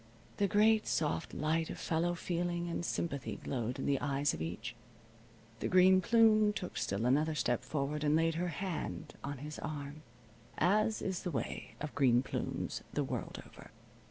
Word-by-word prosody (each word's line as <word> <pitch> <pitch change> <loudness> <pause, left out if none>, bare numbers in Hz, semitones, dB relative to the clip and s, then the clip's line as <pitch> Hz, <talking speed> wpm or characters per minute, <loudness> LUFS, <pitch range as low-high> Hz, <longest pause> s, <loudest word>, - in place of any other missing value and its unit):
The 200 - +3
great, 215 +2 +4
soft 155 -2 0
light 160 +2 0
of - - -5
fellow 170 +2 0
feeling 175 0 -2
and 170 0 -2
sympathy 140 -6 -2
glowed 125 0 -3
in 135 - -3
the 140 -2 +1
eyes 140 0 +1
of - - -5
each. 110 +9 -4 0.8
The - - -1
Green 185 0 +6
Plume 215 -1 +5
took 180 -3 -5
still 100 +4 -1
another 150 +5 +2
step 120 -5 0
forward 150 0 -2
and 150 0 +3
laid 165 +1 +3
her 175 +3 -1
hand 165 -3 -4
on 140 0 -4
his 150 +3 -7
arm 145 0 -5 0.6
(as 215 +5 +2
is 190 -2 -2
the 180 - -3
way 150 - -4
of 150 -1 -5
Green 125 -3 +4
Plumes 135 - -3
the - - 0
world - - -4
over). - - -14
160 Hz, 170 wpm, -34 LUFS, 140-180 Hz, 0.8 s, Green